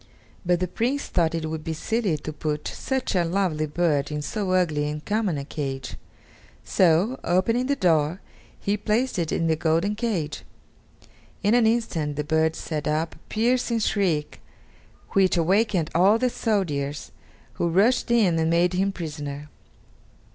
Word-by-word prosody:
But 175 Hz, -1 st, +2 dB
the 185 Hz, -, -1 dB
Prince 250 Hz, +10 st, -1 dB
thought 165 Hz, -2 st, +1 dB
it 160 Hz, -1 st, -2 dB
would 160 Hz, 0 st, -5 dB
be 160 Hz, -, -3 dB
silly 200 Hz, 0 st, -1 dB
to 155 Hz, +1 st, -6 dB
put 150 Hz, 0 st, -3 dB
such 265 Hz, -2 st, -2 dB
a 180 Hz, -3 st, +2 dB
lovely 170 Hz, -3 st, 0 dB
bird 150 Hz, -3 st, 0 dB
in 150 Hz, 0 st, -3 dB
so 205 Hz, +3 st, -3 dB
ugly 155 Hz, -5 st, +1 dB
and 150 Hz, 0 st, -6 dB
common 210 Hz, -6 st, 0 dB
a 140 Hz, -, -5 dB
cage; 135 Hz, -4 st, -5 dB, 0.7 s
so, 185 Hz, +8 st, +2 dB
opening 230 Hz, +8 st, +1 dB
the 280 Hz, -, +1 dB
door, 165 Hz, -, +2 dB, 0.4 s
he 200 Hz, +1 st, 0 dB
placed 215 Hz, +2 st, 0 dB
it 165 Hz, -2 st, -1 dB
in 165 Hz, -, 0 dB
the 160 Hz, -1 st, +2 dB
golden 165 Hz, +5 st, +1 dB
cage. 210 Hz, -9 st, -2 dB, 1.0 s
In 205 Hz, +2 st, +3 dB
an 240 Hz, -2 st, +5 dB
instant 180 Hz, -11 st, 0 dB
the 150 Hz, -, -2 dB
bird 160 Hz, +1 st, +1 dB
set 155 Hz, -2 st, -4 dB
up 155 Hz, +2 st, 0 dB
a -, -, -18 dB
piercing 235 Hz, +1 st, +1 dB
shriek, 185 Hz, -9 st, 0 dB, 0.7 s
which 190 Hz, -2 st, +3 dB
awakened 185 Hz, 0 st, +2 dB
all 195 Hz, +6 st, +5 dB
the 250 Hz, +1 st, 0 dB
soldiers, 150 Hz, -12 st, -2 dB, 0.5 s
who 170 Hz, -, +2 dB
rushed 210 Hz, +11 st, +3 dB
in 205 Hz, -9 st, +3 dB
and 160 Hz, 0 st, +1 dB
made 170 Hz, +2 st, +2 dB
him 195 Hz, +2 st, +1 dB
prisoner. 150 Hz, -4 st, -6 dB
175 Hz, 160 wpm, -24 LUFS, 155-210 Hz, 1.0 s, an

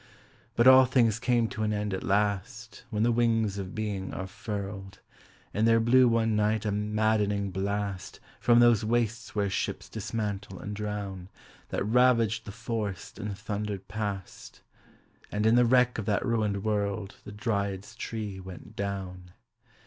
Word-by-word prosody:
But 120 Hz, -, +3 dB
all 130 Hz, 0 st, +9 dB
things 120 Hz, -4 st, +2 dB
come 120 Hz, -2 st, +2 dB
to 110 Hz, -, -6 dB
an 105 Hz, 0 st, +1 dB
end 105 Hz, -1 st, -2 dB
at 95 Hz, -, -2 dB
last 105 Hz, +3 st, -1 dB
When 105 Hz, 0 st, 0 dB
the 120 Hz, -, +3 dB
wings 115 Hz, -4 st, +1 dB
of 95 Hz, 0 st, -6 dB
being 105 Hz, -3 st, -3 dB
are 95 Hz, -, -4 dB
furled. 100 Hz, 0 st, -6 dB, 0.6 s
And 110 Hz, +2 st, +2 dB
there 115 Hz, 0 st, +5 dB
blew 125 Hz, +3 st, +5 dB
one 115 Hz, -2 st, +2 dB
night 105 Hz, +1 st, +1 dB
a 105 Hz, -, +1 dB
maddening 105 Hz, -1 st, 0 dB
blast 100 Hz, -1 st, -3 dB, 0.2 s
From 120 Hz, -1 st, +4 dB
those 120 Hz, -2 st, +5 dB
wastes 115 Hz, 0 st, -1 dB
where 100 Hz, -1 st, +1 dB
ships 95 Hz, -, -3 dB
dismantle 105 Hz, -3 st, -4 dB
and 105 Hz, +2 st, -6 dB
drown, 100 Hz, -3 st, -5 dB, 0.4 s
That -, -, -2 dB
ravaged 115 Hz, -1 st, +3 dB
the 100 Hz, -, -7 dB
forest 105 Hz, -5 st, -5 dB
and 100 Hz, -1 st, -4 dB
thundered 100 Hz, -2 st, -4 dB
past; 100 Hz, -3 st, -6 dB, 0.7 s
And 105 Hz, +1 st, -1 dB
in 110 Hz, -, +5 dB
the 120 Hz, 0 st, +5 dB
wreck 125 Hz, -1 st, +3 dB
of 105 Hz, -, -5 dB
that 105 Hz, -1 st, +1 dB
ruined 105 Hz, -4 st, 0 dB
world 100 Hz, -1 st, -2 dB
The -, -, -9 dB
dryad's 100 Hz, -1 st, -2 dB
tree 105 Hz, -4 st, -5 dB
went 95 Hz, -1 st, -11 dB
down. 95 Hz, -3 st, -5 dB
105 Hz, 155 wpm, -28 LUFS, 100-115 Hz, 0.7 s, all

